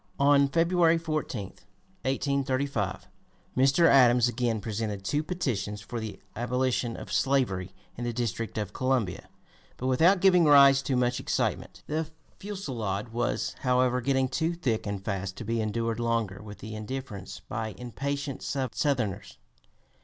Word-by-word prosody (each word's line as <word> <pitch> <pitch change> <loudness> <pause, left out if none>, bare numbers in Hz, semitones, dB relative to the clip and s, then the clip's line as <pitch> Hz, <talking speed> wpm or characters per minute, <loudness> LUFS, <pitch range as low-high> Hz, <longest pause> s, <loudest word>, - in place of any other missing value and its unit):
On 140 0 +5
February 165 +2 +3
14, 155 -9 -3 0.6
1835, 135 -5 -1 0.5
Mr. 135 +6 +4
Adams 125 -5 +6
again 120 -2 0
presented 105 -2 -4
two 150 +6 +1
petitions 130 - -2
for 110 +4 -6
the 110 -2 -6 0.2
abolition 125 0 -1
of - - -7
slavery 100 -9 +1 0.2
in 120 - -6
the 120 - -1
District 115 -2 -3
of 105 -2 -3
Columbia, 125 -8 -1 0.5
but 130 - -5
without 165 +9 +4
giving 180 -2 +5
rise 140 -2 +7
to 135 -1 -1
much 125 0 +1
excitement. - - -2
The 155 +1 -2 0.3
fusillade 120 - -4
was, 120 +1 -1
however, 125 0 +2
getting 135 +1 +2
too 160 +6 -1
thick 120 -11 -1
and 100 -1 -4
fast 95 -2 -3
to - - -5
be 115 +1 0
endured 115 +1 -1
longer 115 -4 -1
with 105 -1 -11
indifference 110 -1 -6
by 110 0 -3
the 95 - -14
impatient 140 +3 -4
Southerners. 125 - -2
125 Hz, 140 wpm, -28 LUFS, 110-140 Hz, 0.6 s, rise